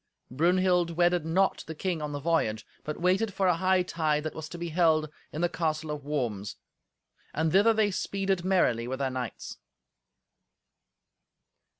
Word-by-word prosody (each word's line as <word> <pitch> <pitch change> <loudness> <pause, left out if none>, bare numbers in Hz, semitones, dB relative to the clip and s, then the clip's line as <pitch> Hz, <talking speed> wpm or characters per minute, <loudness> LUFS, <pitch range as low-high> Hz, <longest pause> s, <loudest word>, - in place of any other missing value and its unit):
Brunhild 175 +3 +2
wedded 175 -2 +2
not 190 +4 +1
the 160 - -6
king 175 0 -2
on 150 -1 -3
the 145 - -4
voyage, 140 -9 0 0.2
but 150 - -5
waited 190 +5 +2
for 190 -1 +2
a 180 - +4
hightide 170 -5 +1
that 155 - -4
was 155 -1 -7
to 175 - -7
be 170 0 -4
held 155 -2 +2 0.2
in 155 - -4
the 175 - +3
castle 160 -2 -2
of 150 -1 -5
Worms; 120 -9 -3 0.8
and 160 +1 +1
thither 205 +6 +5
they 215 -2 +2
speeded 195 -1 -1
merrily 150 -11 +2
with 130 +1 -3
their 135 -1 -1
knights. 125 -2 -6
165 Hz, 160 wpm, -28 LUFS, 150-185 Hz, 0.8 s, thither